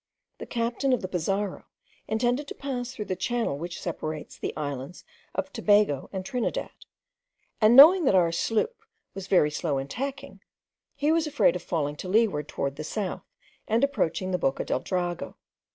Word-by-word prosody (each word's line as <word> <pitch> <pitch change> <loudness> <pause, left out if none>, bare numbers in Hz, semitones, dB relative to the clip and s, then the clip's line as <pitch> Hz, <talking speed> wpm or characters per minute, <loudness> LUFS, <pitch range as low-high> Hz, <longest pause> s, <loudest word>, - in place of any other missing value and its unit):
The - - -7
captain 240 +3 0
of 250 - 0
the - - -2
Pizarro 195 +2 -2 0.4
intended 245 +6 0
to - - -7
pass 255 -3 -4
through 220 -5 -6
the 190 -1 -2
channel 205 -5 -1
which 175 +2 -5
separates 155 -3 -5
the - - -4
islands 145 +2 -5 0.3
of - - -3
Tobago 205 -10 +2
and 190 -1 -5
Trinidad; 245 +3 -2 0.9
and 220 +2 +6
knowing 325 +6 +9
that 200 - +4
our 170 -3 +4
sloop 440 - -1 0.3
was 195 0 -7
very 165 -6 +4
slow 150 -2 -1
in 135 0 -3
tacking, 275 - -6 0.5
he 295 +2 +1
was 325 -1 +2
afraid 290 - +3
of 180 - -3
falling 150 -4 -2
to 185 - -6
leeward 195 -8 +2
towards 140 0 -3
the 155 - -5
south, 195 +4 -3 0.5
and 225 +3 +2
approaching 190 - 0
the 180 - 0
Boca 135 -4 0
del - - 0
Drago. 175 0 -3
195 Hz, 170 wpm, -27 LUFS, 165-245 Hz, 0.9 s, knowing